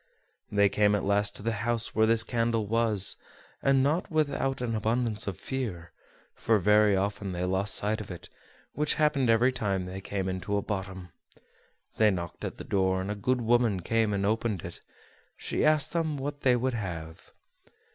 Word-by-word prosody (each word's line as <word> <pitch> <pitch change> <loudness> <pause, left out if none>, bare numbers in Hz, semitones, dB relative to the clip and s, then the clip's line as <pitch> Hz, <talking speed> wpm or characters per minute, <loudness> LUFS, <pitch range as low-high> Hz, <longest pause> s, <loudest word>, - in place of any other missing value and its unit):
They 100 -1 +4
came 105 +1 +2
at 105 - -1
last 100 +1 +2
to - - -8
the 115 - 0
house 115 0 0
where 110 0 +3
this 115 0 +4
candle 115 -2 0
was, 110 -2 0 0.4
not 135 +5 +2
without 140 -4 0
an 120 -2 -2
abundance 110 0 0
of 95 -4 -4
fear: 105 -11 -4 0.4
for 115 - +2
very 105 +1 +4
often 100 0 -2
they 90 0 -3
lost 95 +3 0
sight 105 +1 0
of 105 - -9
it, 90 -2 -8 0.5
which 150 0 0
happened 145 -5 +2
every 115 +3 +4
time 100 -7 -2
they 95 +1 -7
came 95 -1 -3
into 95 +2 -2
a 100 - -1
bottom. 95 -3 -5 0.9
They 110 -1 +5
knocked 85 -4 -4
at - - -5
the - - -7
door, 95 -1 +1
and 95 +2 -3
a - - -3
good 125 +5 0
woman 115 -4 +2
came 110 +3 +1
and 100 -1 0
opened 110 -3 -1
it; - - -9 0.6
she - - -2
asked 155 0 +3
them 160 -3 -1
what 145 +1 -5
they 125 -2 +4
would 130 +1 0
have. 85 -7 -6
105 Hz, 180 wpm, -28 LUFS, 95-125 Hz, 0.9 s, They